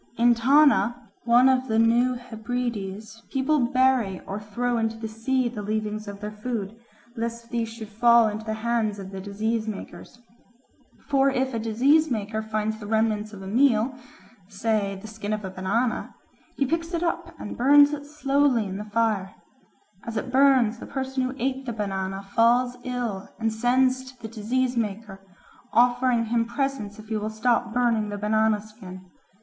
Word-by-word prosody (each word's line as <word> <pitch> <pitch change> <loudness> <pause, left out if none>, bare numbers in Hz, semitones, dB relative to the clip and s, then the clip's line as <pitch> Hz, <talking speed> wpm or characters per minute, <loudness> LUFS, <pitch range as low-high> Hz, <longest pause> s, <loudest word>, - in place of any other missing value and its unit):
In 240 +1 +5
Tana, 240 -3 +3
one 240 +2 +6
of 260 0 +2
the 220 - 0
New 235 +3 +3
Hebrides, 225 -3 -5
people 290 +3 +1
bury 250 -5 +2
or 195 +2 -4
throw 235 +3 -2
into 225 0 -1
the 225 0 -5
sea 240 +4 0
the 230 -3 -5
leavings 215 0 -3
of 200 0 -8
their 210 0 -4
food, 210 -1 -4 0.4
lest 230 0 -5
these 230 -2 -1
should 225 -1 -8
fall 235 +2 +5
into 215 +1 -4
the 220 0 -3
hands 225 -3 0
of 195 -1 -8
the 190 -1 -6
disease 220 +3 -2
makers. 215 +3 -8 0.9
For 275 -1 +3
if 265 -1 -1
a 230 - -1
disease 265 +8 +3
maker 220 -2 -2
finds 215 0 -2
the 205 - -8
remnants 215 -1 0
of 195 -2 -10
a - - -7
meal, 240 +2 +3 0.5
say 205 -1 -1
the 205 - -12
skin 215 -1 -4
of 210 -2 -3
a 190 - -5
banana, 205 +6 -1 0.4
he 275 - +2
picks 330 +4 -2
it 335 - -1
up 340 0 -2
and - - -6
burns 285 +3 +6
it 290 -1 -6
slowly 280 -5 +1
in 190 0 -5
the 210 - -6
fire. 210 -3 0 0.7
As 225 -1 -5
it 250 +4 -3
burns, 260 -4 +4
the - - -8
person 265 0 -3
who 255 +1 -2
ate 265 +1 -2
the 235 - -2
banana 195 -2 -3
falls 240 +5 +2
ill 245 -6 -4
and 225 -1 -1
sends 255 +3 +2
to 255 - -25
the 225 - -7
disease 245 +4 -1
maker, 210 -3 -3 0.5
offering 245 0 +3
him 230 +1 +1
presents 235 -4 -3
if 215 0 -13
he 220 - -1
will 215 +1 -3
stop 235 +2 0
burning 230 -3 +1
the 205 - -4
banana 215 +1 +2
skin. 190 -4 -12
230 Hz, 175 wpm, -25 LUFS, 215-255 Hz, 0.9 s, one